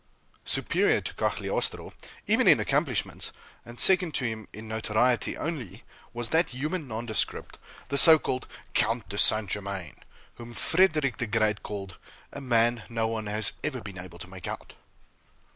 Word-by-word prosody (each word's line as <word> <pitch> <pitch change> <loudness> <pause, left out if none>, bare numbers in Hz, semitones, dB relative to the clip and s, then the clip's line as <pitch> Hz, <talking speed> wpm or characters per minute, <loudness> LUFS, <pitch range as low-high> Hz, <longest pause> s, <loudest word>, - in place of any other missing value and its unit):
Superior - - +2
to - - -6
Cagliostro, - - -2 0.3
even - - +2
in - - +7
accomplishments, - - -1 0.3
and 120 0 -12
second 185 -4 +4
to 130 - +1
him 110 -3 -4
in 110 +2 -10
notoriety 110 +2 0
only, 125 - -5 0.3
was 120 -1 -3
that 165 +2 +2
human 150 +5 -4
nondescript, 110 -1 -3 0.3
the 140 0 +3
so 160 +2 +10
called 130 -4 -3 0.3
Count 115 0 0
de 100 +1 -4
St. 110 -1 +5
Germain, 95 -5 -4 0.4
whom 120 0 -10
Fredrick 155 -6 +2
the 120 - -2
Great 105 -1 +1
called, 100 -3 -7 0.3
"a 140 - -7
man 120 -2 +2
no 115 -1 -1
one 110 -1 -4
has 105 0 +1
ever 145 -3 -2
been 100 -4 -9
able 90 -1 -9
to 85 - -8
make 95 -1 -9
out." - - -7
115 Hz, 155 wpm, -27 LUFS, 105-130 Hz, 0.4 s, so